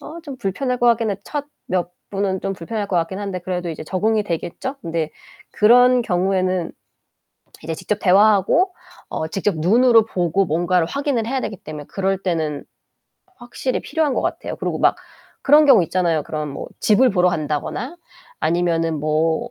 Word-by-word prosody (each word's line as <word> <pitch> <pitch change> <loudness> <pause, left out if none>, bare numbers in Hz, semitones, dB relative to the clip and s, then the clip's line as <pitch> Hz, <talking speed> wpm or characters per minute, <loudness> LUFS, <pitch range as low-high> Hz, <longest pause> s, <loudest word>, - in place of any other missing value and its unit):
어 335 +3 -9
좀 285 -5 -8
불편할 250 +6 -2
것 245 - +2
같긴 230 -2 +3
해. 195 - -2
첫 290 -1 -4 0.2
몇 180 -1 -1 0.2
분은 195 -1 -1
좀 195 - -1
불편할 205 +4 -4
것 180 - 0
같긴 170 +3 -1
한데 195 -3 -4
그래도 180 0 -3
이제 155 - -6
적응이 215 +5 0
되겠죠? 175 - -4
근데 165 -2 -2 0.4
그런 245 +3 +5
경우에는 185 -2 0 0.9
이제 160 +1 -4
직접 210 +5 -3
대화하고 210 - +4 0.3
어 160 - -3
직접 195 +2 -1
눈으로 225 +7 +5
보고 180 0 0
뭔가를 175 +2 +1
확인을 275 - -1
해야 260 +2 -1
되기 210 - -4
때문에 150 -2 -8
그럴 195 0 -1
때는 160 -5 -2 0.7
확실히 245 +1 -3
필요한 310 -5 -1
것 - - 0
같아요. - - -3
그리고 - - -3
막 - - +3 0.5
그런 295 +2 +6
경우 245 -9 +7
있잖아요. 170 -2 0
그런 150 -1 -4
뭐 135 - -7
집을 245 +4 +4
보러 180 -2 +3
간다거나 160 - -3 0.4
아니면은 165 -2 0
뭐 160 +9 0
190 Hz, 345 characters per minute, -20 LUFS, 170-235 Hz, 0.9 s, 경우